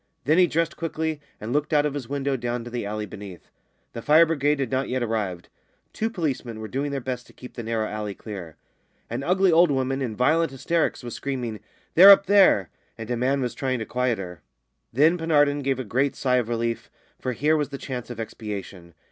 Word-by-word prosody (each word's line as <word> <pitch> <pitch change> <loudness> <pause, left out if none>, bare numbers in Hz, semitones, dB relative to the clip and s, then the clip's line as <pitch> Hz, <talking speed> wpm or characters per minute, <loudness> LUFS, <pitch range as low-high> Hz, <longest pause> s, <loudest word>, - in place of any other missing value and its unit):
Then 155 +6 +4
he 180 - +6
dressed 165 +1 -1
quickly, 160 -2 -3 0.2
and 110 +3 -4
looked 150 +1 0
out 150 -1 +4
of 150 - -1
his 140 -4 -6
window 140 -1 -1
down 120 -1 -3
to 120 - -9
the 120 -4 -3
alley 105 0 -3
beneath. 100 -3 -11 0.4
The 115 - -6
fire 155 +6 +6
brigade 150 -2 +1
had 135 -4 -2
not 130 0 -1
yet 130 -1 -1
arrived. 105 -6 -3 0.5
Two 225 - -1
policemen 135 - -3
were 110 - -6
doing 140 +5 -2
their 140 -1 -2
best 125 -1 -5
to - - -18
keep 125 - -12
the 120 - -6
narrow 110 -1 -1
alley 105 -1 -4
clear. 95 -8 -8 0.6
An 120 +3 -2
ugly 185 +5 +3
old 170 +1 +5
woman, 135 0 0
in 120 -5 -3
violent 160 +7 +2
hysterics, 150 +3 -1
was 120 -2 -6
screaming, 125 -6 -4 0.3
"They're 190 +4 +9
up 200 0 +8
there!" 190 - +5 0.3
and 115 +1 -6
a - - +1
man 130 +3 +1
was 125 -2 -2
trying 130 -2 -1
to 110 - -4
quiet 125 -1 0
her. 90 -4 -8 0.5
Then 155 +8 +3
Penarden 145 -3 +2
gave 135 -1 0
a 130 - -3
great 130 +5 0
sigh 125 -2 +1
of 120 -2 -1
relief, 115 0 -2 0.3
for 130 - -2
here 150 +6 +2
was 150 -2 -1
the 140 - -6
chance 125 -3 -6
of 120 -2 -7
expiation. 100 -6 -7
130 Hz, 215 wpm, -24 LUFS, 115-150 Hz, 0.6 s, They're